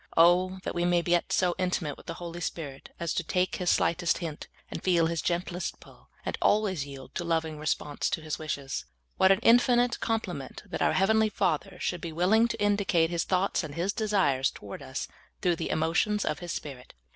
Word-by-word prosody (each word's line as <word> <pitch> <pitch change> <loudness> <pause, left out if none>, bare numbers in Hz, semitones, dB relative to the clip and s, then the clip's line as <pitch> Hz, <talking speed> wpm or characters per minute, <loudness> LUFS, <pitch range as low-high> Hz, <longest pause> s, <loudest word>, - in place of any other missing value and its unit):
Oh, 180 +3 +5
that - - -3
we 175 - -1
may 175 -1 +3
get 175 0 +1
so 180 -1 +2
intimate 180 -5 -1
wdth - - -17
the 165 - -3
Holy 175 0 -7
Spirit 145 -5 -5
as 170 -2 -1
to 180 - -1
take 180 +2 0
His 180 -1 0
slightest 170 0 +2
hint, 160 -4 -6 0.2
and - - -5
feel 175 -3 +3
His 165 0 -1
gentlest 175 0 -2
pull, - - -18 0.2
and - - -3
always 190 -9 +2
yield 135 -1 -10
a - - -3
loving 160 -2 -1
response 150 -1 -1
to 160 - -2
His 155 -1 -4
wishes! 140 - -4 0.3
What 190 - +6
an 195 - +4
infi 245 +2 +6
nite 245 0 +2
compliment 190 - -3
that - - -5
our - - +3
heavenl}^ 220 +2 +3
Father 180 +1 -1
should 180 - -2
be 170 - -4
willing 195 +8 +3
to 230 -1 -4
indicate 200 -5 +2
His 170 -1 0
thoughts 185 0 +1
and 145 -2 -7
His 185 +4 0
desires 190 -12 +2
toward 100 -1 -9
us - - -5 0.4
through 175 -2 +2
the - - -3
emotions 165 +7 +1
of - - -1
His 175 -2 -5
Spirit! 135 - -7
175 Hz, 205 wpm, -28 LUFS, 160-190 Hz, 0.4 s, What